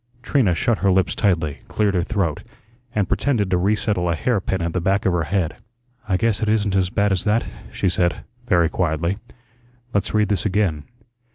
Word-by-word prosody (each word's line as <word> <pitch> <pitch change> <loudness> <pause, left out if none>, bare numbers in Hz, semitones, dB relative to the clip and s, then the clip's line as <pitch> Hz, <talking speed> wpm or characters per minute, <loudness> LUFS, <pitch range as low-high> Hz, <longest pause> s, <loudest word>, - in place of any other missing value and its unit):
Trina 115 - +2
shut 115 +6 +1
her 100 - +3
lips 95 0 +2
tightly, 80 -8 0
cleared 105 -2 0
her 90 - +2
throat, 85 -4 -1 0.5
and 100 -3 +1
pretended 105 -8 0
to 90 - +3
resettle 100 -2 0
a 85 - +1
hair 110 +4 0
pin 95 0 -2
at 85 -1 -2
the 90 - -1
back 95 +3 +1
of 95 - +3
her 85 -2 0
head. 90 -4 -1 0.5
"I 95 - +3
guess 115 +1 0
it 110 - +1
isn't 105 -2 +1
as 95 -2 +2
bad 100 +1 +1
as 95 -2 +1
that," 110 +2 +2 0.3
she - - -1
said, 85 -1 0 0.2
very 85 -6 +4
quietly. 85 +3 -1 0.7
"Let's 100 +1 0
read 105 -1 +2
this 100 -4 0
again. 95 -7 0
95 Hz, 195 wpm, -21 LUFS, 85-105 Hz, 0.7 s, very